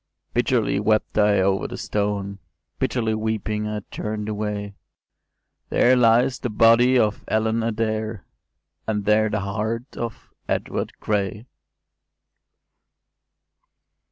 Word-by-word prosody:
“Bitterly - - +1
wept 110 +1 +1
I 105 -2 +4
over 95 0 +1
the - - -7
stone: 100 -1 -2 0.4
Bitterly 115 -3 0
weeping 110 -1 -2
I 105 0 -3
turn’d 105 0 -4
away; 105 -1 -3 1.0
There 125 +1 +4
lies 120 +1 +4
the 125 - -3
body 115 +4 +5
of 105 -3 +1
Ellen 110 +1 +1
Adair! 110 -1 -2 0.6
And 105 -2 -1
there 110 +1 +3
the 105 -1 -1
heart 110 +5 -3
of 115 -2 -6 0.2
Edward - - -2
Gray! 105 +1 -2
110 Hz, 105 wpm, -23 LUFS, 105-115 Hz, 1.0 s, body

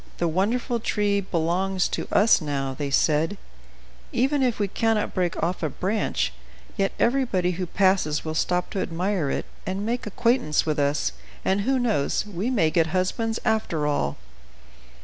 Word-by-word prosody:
"The 170 - +1
wonderful 230 +8 0
tree 205 -2 +1
belongs 185 +1 0
to - - -3
us 205 -1 +5
now," 140 -3 -2
they 140 +1 -3
said; 155 +7 +2 0.7
"even 275 +3 +1
if 250 -3 +1
we 205 - 0
cannot 220 +2 0
break 180 -3 0
off 175 +2 -1
a 155 - 0
branch, 190 - -1 0.4
yet 195 0 +1
everybody 235 -8 +2
who 180 +1 -3
passes 185 -5 +2
will 155 - -2
stop 180 +3 0
to 195 - -1
admire 175 -2 -1
it, - - -2 0.2
and 190 +2 -3
make 235 0 -2
acquaintance 210 - +1
with 155 -1 0
us, 140 - +1 0.3
and, 195 +1 +2
who 265 +6 +1
knows? 220 - +1
we 205 +3 -3
may 195 -11 +2
get 165 -1 +3
husbands 190 +6 -1
after 215 -9 0
all." 110 - 0
190 Hz, 160 wpm, -25 LUFS, 160-215 Hz, 0.7 s, us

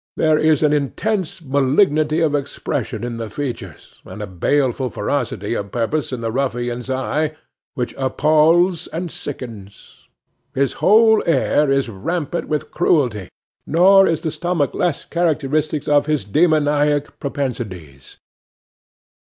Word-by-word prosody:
There 155 -1 +3
is 155 -1 +3
an 150 -1 +3
intense 185 +5 -2
malignity 150 +3 +2
of 155 -3 +2
expression 140 -4 -3
in 120 -1 -4
the 115 -1 -5
features, 135 +2 -7
and - - -10
a 105 - -4
baleful 130 +7 0
ferocity 110 -2 -2
of 100 -3 -4
purpose 125 +6 -1
in 125 -2 -4
the 115 -1 -2
ruffian's 120 -1 -2
eye, 150 +4 -1 0.4
which 125 -1 -3
appals 155 +6 +3
and 170 0 -4
sickens. 110 -8 -9 0.5
His 135 0 +1
whole 220 +1 +5
air 150 -1 +2
is 135 -1 +1
rampant 155 - -3
with 150 -1 -3
cruelty, 125 - +1 0.4
nor 195 +4 +5
is 165 - -1
the 160 - -1
stomach 165 -2 -1
less 175 -5 -1
characteristic 155 -3 -1
of 145 0 +3
his 150 -8 0
demoniac 150 - +1
propensities. 105 - -5
145 Hz, 130 wpm, -19 LUFS, 125-155 Hz, 0.5 s, whole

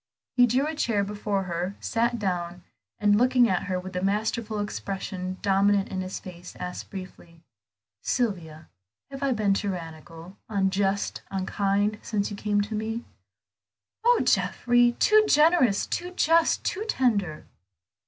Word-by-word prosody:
He 245 -1 +6
drew 255 +4 +1
a 310 - -2
chair 230 -9 0
before 205 -1 -2
her, 180 +2 -3
sat 235 +1 0
down, 180 -3 -3 0.3
and 205 0 +3
looking 250 0 +4
at 185 -4 0
her 185 -2 -1
with 185 +1 -8
the 180 - -2
masterful 215 +2 -1
expression 190 -2 -4
dominant 200 0 +3
in 190 -1 -3
his 185 0 -5
face, 180 -1 -11
asked 180 0 -6
briefly 175 -3 -10 0.6
"Sylvia, 170 - -2 0.4
have 270 0 -7
I 275 -1 +1
been 215 -4 +2
tyrannical, 170 -2 -6
unjust, 195 -1 0
unkind, 200 +2 0
since 210 -2 -2
you - - -4
came 205 0 0
to 210 +2 -4
me?" 220 +2 -3 1.0
"Oh, 480 +1 +4
Geoffrey, 245 0 +3
too 430 - +5
generous, 300 - +4
too 355 +1 -3
just, 330 -2 +2
too 405 - -2
tender!" 200 - 0
205 Hz, 140 wpm, -26 LUFS, 185-235 Hz, 1.0 s, He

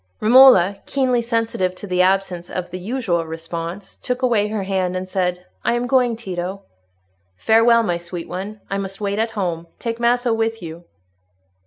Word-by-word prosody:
Romola, 215 -5 +7
keenly 255 -3 +1
sensitive 225 -6 -1
to 195 - -8
the 180 -2 +1
absence 185 -2 +1
of 180 -1 -5
the 185 - -5
usual 190 -4 -1
response, 165 +4 -6
took 250 +1 -4
away 225 -5 +2
her 210 -2 -3
hand 185 -1 -1
and 185 0 -5
said, 180 -1 -2 0.2
"I 235 - +2
am 240 0 -1
going, 250 -2 +2
Tito." 190 -2 -5 0.7
"Farewell, 230 - +4
my 175 -5 0
sweet 170 0 -7
one. 200 +3 -6
I 195 - -2
must 195 0 -6
wait 200 0 -2
at 225 0 -2
home. 170 -4 -2
Take 230 0 -4
Maso 240 0 +2
with 225 0 -1
you." 170 0 -9
195 Hz, 170 wpm, -20 LUFS, 180-230 Hz, 0.7 s, Romola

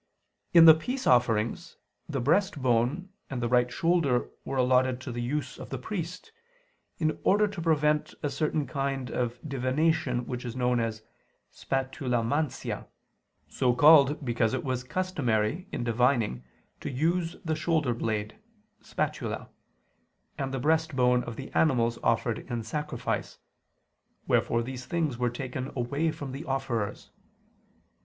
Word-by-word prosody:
In 170 -1 +8
the 160 - +11
peace 250 +12 -4
offerings, 120 +7 +2 0.3
the 140 -3 -2
breast 175 +7 +2
bone 130 +9 +1 0.2
and 130 - -3
the 120 - 0
right 125 0 +3
shoulder 150 - +1
were 135 - -4
allotted 130 0 +3
to 130 - -6
the 120 0 -4
use 130 +2 -3
of - - -8
the 135 - -3
priest, 180 - -5 0.7
in 155 -1 0
order 210 +2 +4
to 200 -4 -6
prevent 150 -2 +1
a 145 - 0
certain 155 -1 0
kind 135 -3 -3
of 120 -1 -2
divination 130 -1 0
which 125 0 -5
is 120 -1 -5
known 125 -1 +1
as 110 -1 -3 0.5
"spatulamantia," 130 +1 -2 0.6
so 125 -2 +1
called 145 0 +6
because 120 -2 +1
it - - -3
was 130 -2 -2
customary 145 - -1
in - - -3
divining 115 - +1 0.4
to - - -5
use 165 +5 0
the 160 -1 0
shoulder 155 -6 +1
blade 110 -2 -3 0.4
(spatula), - - -3 0.9
and 135 -1 -3
the 135 - -2
breast 160 +2 +1
bone 125 -1 +3
of 120 - -6
the 135 - -8
animals 120 -7 +2
offered 115 0 +1
in 120 -2 -2
sacrifice; 150 +7 -3 0.9
wherefore 115 0 +2
these 130 +1 -7
things 160 -8 -1
were 125 0 +2
taken 130 +2 -5
away 140 +6 0
from 140 -3 -7
the 135 +4 -6
offerers. 135 -7 -3
130 Hz, 140 wpm, -28 LUFS, 120-155 Hz, 0.9 s, the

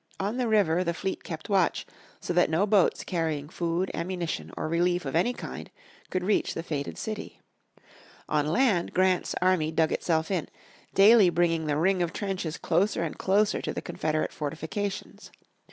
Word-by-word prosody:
On 205 +5 -2
the 250 -2 0
river 185 -6 +3
the 170 -1 -2
fleet 190 +1 -3
kept 160 -2 -7
watch, 195 -5 +1 0.3
so - - -3
that 175 -2 +3
no 165 +5 +2
boats 200 -3 +3
carrying 160 -5 -2
food, 170 +3 -1
ammunition, 170 - -3
or - - -2
relief 175 +1 +1
of 135 - -3
any 180 +9 +3
kind - - -7 0.4
could 185 -1 -2
reach 205 +3 +1
the 165 - -3
fated 145 -4 -4
city. 215 -1 -6 0.9
On 150 -1 +1
land 185 - +1
Grant's 185 -1 +2
army 180 -4 +2
dug 160 0 +2
itself 160 +1 0
in, 180 -5 -1 0.5
daily 205 -1 +7
bringing 165 -2 +1
the 145 -1 +1
ring 185 +3 +2
of 170 -1 -1
trenches 190 -6 -3
closer 175 +1 +1
and 165 - -4
closer 205 +2 +2
to - - -3
the - - -4
Confederate 155 0 -2
fortifications. 165 +7 -5
175 Hz, 170 wpm, -27 LUFS, 160-195 Hz, 0.9 s, daily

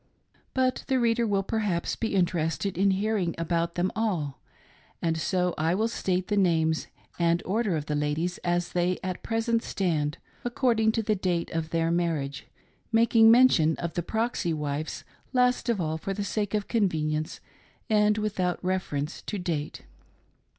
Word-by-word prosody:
But 260 0 +1
the 260 -1 +2
reader 235 -1 +2
will 200 -2 +1
per 220 +3 -1
haps 185 -6 -1
be 225 -3 -2
interested 175 +1 0
in 195 +3 +3
hearing 195 -2 0
about 170 0 -1
them 180 +1 0
all, 180 - -1 0.6
and 165 -1 0
so 180 +2 0
I 165 +3 +2
will 220 +3 +1
state 185 -5 -1
the 205 - 0
names 160 -4 +2 0.3
and 170 0 +2
order 205 -1 0
of 150 - -4
the 150 - -2
ladies 150 +4 -1
as 175 0 -1
they 180 0 +1
at 185 -1 -3
present 225 0 0
stand 160 -7 -1
— - - -31
according 240 -3 +2
to 225 - 0
the 215 - +1
date 180 -4 -1
of 165 -1 -2
their 165 0 +1
marriage; 155 -5 -1 0.4
making 225 0 +6
mention 230 -10 +6
e* 170 - -1
the 175 - -1
proxy 220 -2 -1
wives 150 0 -3 0.3
last 250 -1 +2
of 230 -4 +1
all,, 160 -1 -1
for 195 +4 -3
the 205 - -2
sake 205 0 -1
of 205 -1 -1
con 215 -5 +2
venience 155 -1 -2 0.5
and 210 -1 +3
without 195 -4 -1
reference 175 -5 -2
to 210 - -4
date. 165 -5 -3
180 Hz, 170 wpm, -27 LUFS, 165-220 Hz, 0.6 s, making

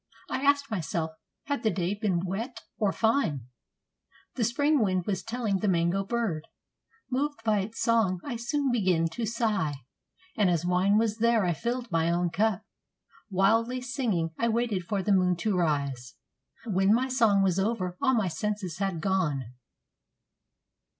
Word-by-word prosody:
I - - -1
asked 280 -1 +2
myself, 165 -4 -2 0.3
had 285 0 -2
the 220 - +2
day 180 -1 -1
been 195 -4 -1
wet 225 +6 -4 0.2
or 205 -2 +2
fine? 220 - +1 0.9
The 245 - -1
Spring 285 +6 +2
wind 185 -4 +1
was 190 -3 -1
telling 225 -4 -2
the 210 - -1
mango 175 +1 +2
bird. 200 -8 -2 0.6
Moved 280 -1 -1
by 215 -2 +2
its 205 +4 -5
song 220 -6 +2
I 275 -4 -4
soon 265 +4 -1
began 185 -8 +2
to 225 +7 -3
sigh, 210 - 0 0.6
And 205 -3 +3
as 170 -1 0
wine 185 +3 +3
was 220 -1 +1
there 230 -3 +3
I 175 - +1
filled 235 +5 -3
my 165 0 +2
own 175 0 +1
cup. 215 +1 +1 0.7
Wildly 225 +6 +2
singing 245 - -1
I 230 - +2
waited 225 -5 0
for 200 0 -1
the 210 - +1
moon 180 -1 +3
to 195 +3 -1
rise; 140 -7 -1 0.5
When 195 -1 +3
my 255 +2 +1
song 225 -7 +3
was 190 -1 +2
over, 190 -3 -1
all 260 - +3
my 215 -5 +1
senses 205 -2 -3
had 195 -5 -1
gone. 150 - -1
205 Hz, 160 wpm, -28 LUFS, 180-230 Hz, 0.9 s, And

